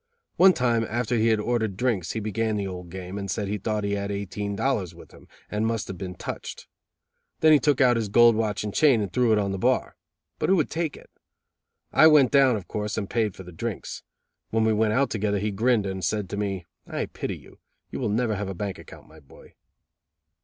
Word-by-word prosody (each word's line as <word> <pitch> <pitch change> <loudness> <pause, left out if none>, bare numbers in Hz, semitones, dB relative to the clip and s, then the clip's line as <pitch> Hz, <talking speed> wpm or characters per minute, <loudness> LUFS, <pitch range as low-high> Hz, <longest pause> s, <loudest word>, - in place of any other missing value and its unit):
One 185 +1 +7
time, 120 -4 +1
after 120 +1 -1
he 115 0 +2
had 110 -1 +3
ordered 110 -3 -1
drinks, 110 -9 -1
he 110 - -2
began 110 +1 -1
the 100 - -2
old 90 -2 -7
game, 95 +2 -6
said 100 +1 -2
he 105 +1 -2
thought 105 +1 -2
he 100 - -1
had 100 0 -2
eighteen 100 +1 -4
dollars 110 -6 -1
with - - -14
him, - - -17 0.2
and 105 +1 0
must 115 -2 -2
have 95 - -6
been 90 -1 -6
touched. - - -7 0.8
Then 155 0 +7
he 150 - +6
took 145 -3 +2
out 125 -2 +5
his 110 -3 -2
gold 120 +2 +6
watch 105 -2 -1
and 105 -1 -4
chain 140 -7 +4
and 100 -2 -4
threw 125 -1 +3
it 110 - +4
on 100 -1 0
the 95 - -3
bar. - - +1 0.4
But - - 0
who 190 - +5
would 160 - 0
take 160 -2 -2
it? - - -17 0.8
I 155 - +7
went 150 -5 +6
down, 135 -3 +5
of 95 -5 -6
course, 105 0 -3
and 100 - -2
paid 110 -4 -1
for 95 - -10
the 90 - -11
drinks. 105 +5 -5 0.5
When 115 0 +1
we 110 - +3
went 110 0 +2
out 135 +4 +1
together, 105 -1 0
he 105 +2 -1
grinned, 110 +1 +2
and 95 -1 -4
said 100 +2 -1
to - - -2
me: 100 -3 -3 0.2
"I - - -3
pity - - -5
you. - - -18 0.3
You - - -5
will 120 -5 -1
never 110 +1 0
have 100 0 -4
a 95 - -5
bank 100 +1 -4
account, - - -13
my 80 0 -16
boy." 70 - -18
105 Hz, 230 wpm, -25 LUFS, 100-120 Hz, 0.8 s, One